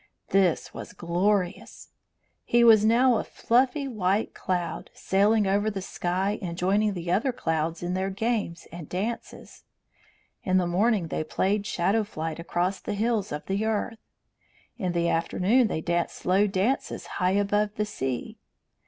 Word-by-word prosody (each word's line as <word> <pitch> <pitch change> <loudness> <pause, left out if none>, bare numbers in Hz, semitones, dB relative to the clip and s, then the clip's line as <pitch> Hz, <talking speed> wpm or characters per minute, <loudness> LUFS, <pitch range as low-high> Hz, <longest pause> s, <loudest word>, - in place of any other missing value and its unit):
This 190 -4 +2
was - - -8
glorious. 180 +2 -1 0.5
He 240 0 +3
was 220 -3 +7
now 240 +2 +4
a - - -1
fluffy 265 +4 +1
white 205 -3 0
cloud, 175 -3 -3
sailing 205 +2 +2
over 200 +2 +1
the 200 -2 -4
sky 190 +3 -2
and 170 -3 -5
joining 200 +3 +1
the 175 -1 -3
other 220 +8 +2
clouds 165 -6 -2
in 175 +1 -2
their 190 +1 -1
games 200 -4 -2
and 170 -3 -9
dances. 215 +6 -5 0.8
In 185 0 +2
the 180 - +2
morning 190 0 +1
they - - -2
played 200 +6 -1
shadow 200 +6 +1
flight 160 -5 -5
across 175 +3 -1
the - - -4
hills 220 -1 0
of 150 0 -5
the 195 +2 -1
earth; 220 +1 -2 0.8
in 185 -6 -2
the 170 0 +1
afternoon 190 +9 +2
they 160 - -3
danced 170 +1 -1
slow 195 +3 +2
dances 200 +7 -1
high 180 0 0
above 205 +1 +1
the 210 - 0
sea. 135 - -4
195 Hz, 155 wpm, -26 LUFS, 175-215 Hz, 0.8 s, was